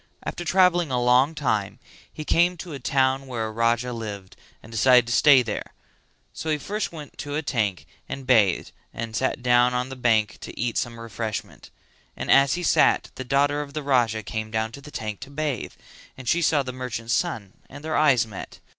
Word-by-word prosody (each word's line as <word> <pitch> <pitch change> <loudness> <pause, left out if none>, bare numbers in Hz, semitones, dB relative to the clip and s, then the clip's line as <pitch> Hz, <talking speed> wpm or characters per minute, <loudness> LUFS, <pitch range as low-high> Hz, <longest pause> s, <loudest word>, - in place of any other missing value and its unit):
After 175 - -5
travelling 175 -2 +3
a 125 -1 0
long 125 +5 +3
time 105 -9 -1 0.3
he 155 - -8
came 175 +3 +3
to 170 -1 -8
a 140 - -6
town 135 +1 +1
where 120 -3 -3
a 110 - -4
Raja 115 +2 0
lived 105 -4 -7 0.3
and 110 - -13
decided 125 +2 +5
to 120 - -2
stay 140 -2 +6
there; 110 -3 -5 0.6
so 160 - -5
he 155 - +2
first 205 +9 -3
went 150 -4 -11
to 145 0 -4
a 155 - -1
tank 110 - -1 0.2
and 135 -1 -6
bathed 110 -8 +3 0.2
and 115 -1 -5
sat 130 0 -1
down 125 0 +4
on 125 +1 -1
the 130 - -7
bank 115 -4 +1
to - - -9
eat 120 -1 -1
some 120 -2 -4
refreshment; 115 -1 -6 0.5
and - - -2
as 135 +2 +5
he 180 - -4
sat - - +3
the 130 - -6
daughter 145 +3 +1
of 145 0 -9
the 155 - -3
Raja 120 -6 +1
came 110 +1 -4
down 110 0 -2
to 140 - -10
the 150 - -11
tank 110 -7 -5
to 135 - -9
bathe 145 -2 -3 0.4
and 130 -2 -10
she 170 +8 +2
saw 150 -3 +2
the 130 -1 -6
merchant's 120 -2 -4
son 110 - -2 0.2
and 145 - -11
their 155 0 -2
eyes 135 -6 +4
met. 105 -4 -9
125 Hz, 205 wpm, -24 LUFS, 115-145 Hz, 0.6 s, stay